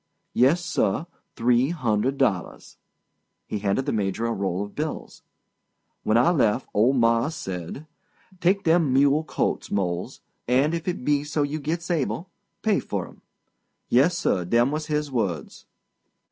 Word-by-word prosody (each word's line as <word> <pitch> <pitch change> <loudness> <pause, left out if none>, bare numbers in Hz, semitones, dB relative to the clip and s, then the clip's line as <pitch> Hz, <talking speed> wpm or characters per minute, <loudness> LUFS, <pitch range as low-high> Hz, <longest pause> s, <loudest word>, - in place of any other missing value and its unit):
"Yessir—three 130 - +1
hundred 130 -4 0
dollars." 100 -10 -1 0.7
He 105 - -4
handed 100 +6 0
the - - 0
Major 105 +1 -1
a 115 - 0
roll 95 -1 -1
of 105 - -9
bills. 155 +1 -5 0.8
"When 110 - +2
I 145 +9 +5
lef' 130 -7 +2
old 120 +6 +3
mars' 115 +5 +2
says: 90 - -6 0.6
''Take 190 +3 +2
dem 165 -4 +3
mule 140 +3 +4
colts, - - -2
Mose, 90 -3 -2 0.3
and, 135 +6 +3
if 170 +1 -3
it 175 -8 -3
be 145 -1 +2
so 150 0 -1
you 145 +2 -2
gits 165 +4 -3
able, 165 +3 -2 0.3
pay 215 -2 +3
fur - - -4
'em.' - - -18 0.7
Yessir—dem 120 - +2
was 155 0 -3
his 150 -1 -1
words. 95 - -3
135 Hz, 135 wpm, -25 LUFS, 110-155 Hz, 0.8 s, I